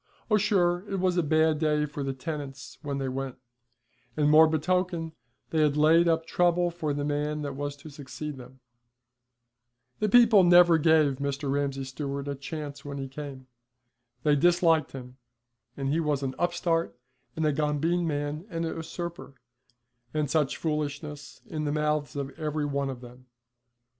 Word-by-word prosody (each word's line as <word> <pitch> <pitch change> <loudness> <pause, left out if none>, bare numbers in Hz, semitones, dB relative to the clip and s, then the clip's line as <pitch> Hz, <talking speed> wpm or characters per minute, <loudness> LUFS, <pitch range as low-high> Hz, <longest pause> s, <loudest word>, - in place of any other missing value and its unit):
Oh, 210 - +6
sure 180 -4 +2
it 195 -1 -2
was 185 -1 +1
a 175 - +3
bad 155 0 +2
day 150 -1 +1
for 145 0 -6
the 135 - -1
tenants 135 -2 -7
when 145 -2 -3
they 135 -1 -2
went; 130 0 -4 0.8
and 150 -1 +3
more 160 +1 +8
betoken, 165 +1 0 0.4
they 160 - +2
had 150 -1 +2
laid 165 +3 +5
up 165 -1 +1
trouble 175 0 +2
for 160 -3 -3
the 145 0 -2
man 150 +1 -1
that 140 -1 -4
was 145 +1 -4
to 145 +2 -12
succeed 145 +1 -7
them. 130 0 -13 1.4
The 215 - +1
people 230 -3 +7
never 175 -1 +6
gave 155 -3 +4
Mr. 140 0 -2
Ramsay 140 -1 -1
Stewart 140 +1 -5
a 140 - -2
chance 145 0 -7
when 140 -1 -6
he 135 -1 -4
came. 135 -1 -8 0.8
They 150 -1 +4
disliked 165 0 +3
him, 125 -1 -9 0.6
and 135 -1 -2
he 155 +4 +1
was 150 -4 0
an 130 -1 -2
upstart 170 -3 0 0.4
and 160 - -1
a 150 - +2
gombeen 155 +4 0
man 145 +3 -3
and 165 -2 -3
a - - -2
usurper, 165 -2 -6 0.8
and 150 -2 0
such 150 -3 +1
foolishness, 150 -1 -4
in 155 -1 -4
the 145 - 0
mouths 150 -1 -1
of 140 -1 -3
every 150 -1 -2
one 140 -1 -1
of 130 -2 -6
them. 125 +1 -14
150 Hz, 170 wpm, -27 LUFS, 140-165 Hz, 1.4 s, more